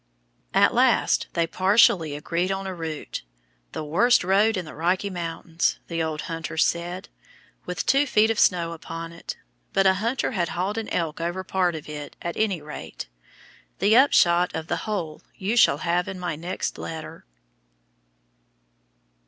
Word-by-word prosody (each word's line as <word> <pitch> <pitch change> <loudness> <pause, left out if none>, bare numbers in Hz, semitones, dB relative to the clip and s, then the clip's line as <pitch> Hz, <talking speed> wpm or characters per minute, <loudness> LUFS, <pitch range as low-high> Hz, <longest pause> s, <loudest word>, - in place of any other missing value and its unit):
At - - +5
last - - +3
they 170 - +2
partially 185 -4 +3
agreed 170 +5 -1
on 195 0 -3
a 190 - -4
route 160 - -5 0.5
"the - - -5
worst 200 +12 +3
road 200 +4 +3
in 180 - -3
the 155 - -10
Rocky 185 +5 0
Mountains," 170 -1 -2
the 165 -1 -1
old 160 -1 -2
hunter 165 -1 -5
said, 175 +3 0 0.6
with 180 -1 -3
two 280 +2 +3
feet 220 -2 +4
of 225 - -1
snow 170 -2 +3
upon 165 0 -7
it, 170 - -7 0.4
but 195 0 +3
a 190 - +6
hunter 235 +5 0
had 175 -7 -1
hauled 190 +6 -2
an 220 - -5
elk 165 -1 -2
over 175 +3 -2
part 180 -2 0
of 155 - -8
it, 150 -1 -7
at 170 -1 -4
any 195 -8 0
rate. 150 - -8 0.7
The 205 +4 +3
upshot 180 -9 +4
of 160 -1 -3
the - - -2
whole 165 -7 -3
you 200 +5 -2
shall 230 -11 +5
have 175 +1 +1
in 190 - -5
my 175 -3 -3
next 175 +4 -4
letter. 160 - -7
175 Hz, 160 wpm, -25 LUFS, 165-195 Hz, 0.7 s, a